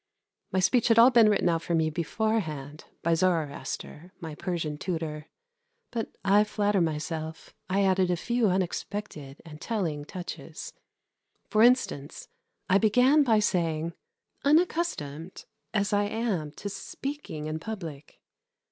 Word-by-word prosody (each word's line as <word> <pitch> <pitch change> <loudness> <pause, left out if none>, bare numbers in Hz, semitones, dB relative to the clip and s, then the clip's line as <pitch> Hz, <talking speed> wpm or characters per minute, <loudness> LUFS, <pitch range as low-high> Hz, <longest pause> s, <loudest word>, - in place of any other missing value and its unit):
My 190 - +1
speech 235 +5 +3
had 230 -1 +4
all 235 +3 +8
been 230 -3 +6
written 205 - +2
out 165 -1 +2
for 170 - -1
me 160 -1 +2
beforehand 155 -5 -2 0.2
by 170 - +3
Zoroaster, 165 0 -2
my 160 -2 -6
Persian 155 -3 -3
tutor; 160 -4 -4 0.6
but 230 -2 -3 0.2
I 200 +2 +6
flatter 205 -2 +1
myself 160 0 -3 0.2
I 195 +2 +2
added 190 -1 +3
a 180 - +2
few 235 +4 +1
unexpected 180 -5 -3
and 155 -1 -11
telling 165 -10 -2
touches. 180 +1 -7 0.8
For 215 - +4
instance, 230 - +2 0.4
I 195 +2 +4
began 250 +8 +5
by 235 -6 +4
saying: 170 -5 0 0.5
"Unaccustomed 280 - 0 0.3
as 205 -2 0
I 205 0 +3
am 205 -7 -1
to 205 - -7
speaking 200 - -6
in 155 +1 -3
public 165 -7 -7
185 Hz, 130 wpm, -28 LUFS, 160-215 Hz, 0.8 s, all